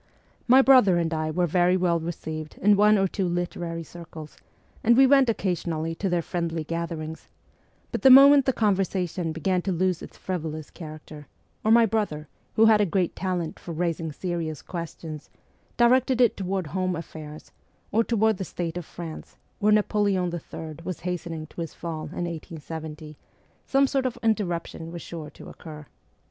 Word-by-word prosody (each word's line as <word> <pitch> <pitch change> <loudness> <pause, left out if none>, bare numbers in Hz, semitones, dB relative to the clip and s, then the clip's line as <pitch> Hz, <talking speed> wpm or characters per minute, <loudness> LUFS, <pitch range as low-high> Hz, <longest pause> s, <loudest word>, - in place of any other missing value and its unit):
My 260 +2 +7
brother 250 -10 +6
and 165 -1 0
I 155 0 -1
were 175 +3 +1
very 180 +2 +3
well 175 -2 +1
received 160 -2 -6
in 205 +2 +4
one 210 +1 +5
or 195 0 +2
two 190 0 -2
literary 175 -1 -3
circles, 160 -2 -11 0.5
and 235 +1 +5
we 270 - +8
went 270 -2 +5
occasionally 170 -6 -1
to 195 +4 -2
their 175 -1 0
friendly 170 -2 -3
gatherings; 160 -1 -5 0.6
but - - -3
the 270 - +7
moment 275 +1 +9
the - - +5
conversation 190 -6 0
began 180 +3 0
to 190 - -2
lose 180 0 0
its - - -11
frivolous 155 -4 -5
character, 155 -3 -10 0.4
or 220 - +1
my 230 +1 +7
brother, 205 -9 -2 0.3
who 220 - +6
had 220 -1 +6
a - - +4
great 180 0 0
talent 180 -4 -3
for 170 - -7
raising 165 -1 -2
serious 165 -2 -4
questions, 165 -3 -7 0.5
directed 250 +1 +4
it 245 -3 +4
toward 190 -1 -2
home 185 +3 -2
affairs, 155 -2 -9 0.4
or 225 +3 +3
toward 220 -2 +2
the 190 - -3
state 175 -2 -4
of 175 - -5
France, 165 -2 -9 0.2
where 210 +1 +3
Napo 210 0 +2
leon 185 -4 +1
III 160 -2 -7
was 185 -1 -5
hastening 170 -3 -4
to 170 - -8
his 165 - -6
fall 160 -2 -5
in 175 +3 -4
1870, 160 -2 -7 0.5
some 275 +1 +4
sort 270 -1 0
of 250 - -5
interruption 175 -6 -1
was 170 -1 -7
sure 160 -3 -7
to - - -13
occur. 155 -2 -10
175 Hz, 170 wpm, -25 LUFS, 160-205 Hz, 0.6 s, moment